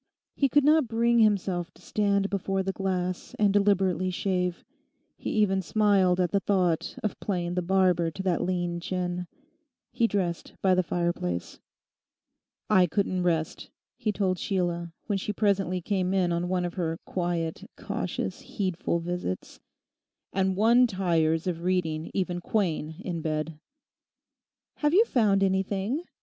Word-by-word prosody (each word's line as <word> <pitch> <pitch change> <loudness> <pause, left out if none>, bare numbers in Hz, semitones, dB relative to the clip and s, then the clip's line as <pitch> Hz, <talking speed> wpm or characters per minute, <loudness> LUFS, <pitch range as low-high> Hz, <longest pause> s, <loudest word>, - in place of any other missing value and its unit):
He 275 - +2
could 290 +2 +4
not 305 -2 +4
bring 235 +1 +2
himself 195 -5 +2
to - - -19
stand 200 -1 +1
before 195 -1 -1
the 195 - -1
glass 185 -2 -3
and 205 -2 +3
deliberately 195 -3 +2
shave. 180 -1 -1 0.5
He - - -5
even 195 -3 +2
smiled 195 -2 +3
at 180 -1 +1
the 200 - +3
thought 185 -5 0
of 215 - -2
playing 175 -3 -2
the 180 - 0
barber 180 -2 +2
to 190 +4 -6
that 185 -3 +1
lean 175 -1 -1
chin. 180 0 -3 0.6
He 235 -1 +2
dressed 180 -5 -2
by 190 -1 +3
the 185 - +4
fireplace. 170 - -2 1.1
'I 185 -4 +5
couldn't 185 0 0
rest,' 165 -3 -1 0.3
he 215 - -1
told 190 -3 0
Sheila, 175 -3 -1
when 205 -3 -1
she 210 - -3
presently 195 -3 +1
came 190 0 0
in 180 -2 +2
on 170 +1 -1
one 180 -1 0
of 175 - -4
her 165 -3 -2
quiet, 175 -3 -3
cautious, - - -3
heedful 185 -4 -2
visits; 175 - -4 0.7
'and 190 0 +1
one 235 +5 +5
tires 165 -5 +1
of 170 -2 -2
reading 165 -3 -1
even 180 -2 -1
Quain 165 -7 -1
in 170 -3 -3
bed.' 155 0 -3 1.2
'Have 295 +2 +2
you 440 +4 +6
found 205 - +2
anything? 195 - 0
185 Hz, 145 wpm, -27 LUFS, 175-200 Hz, 1.2 s, you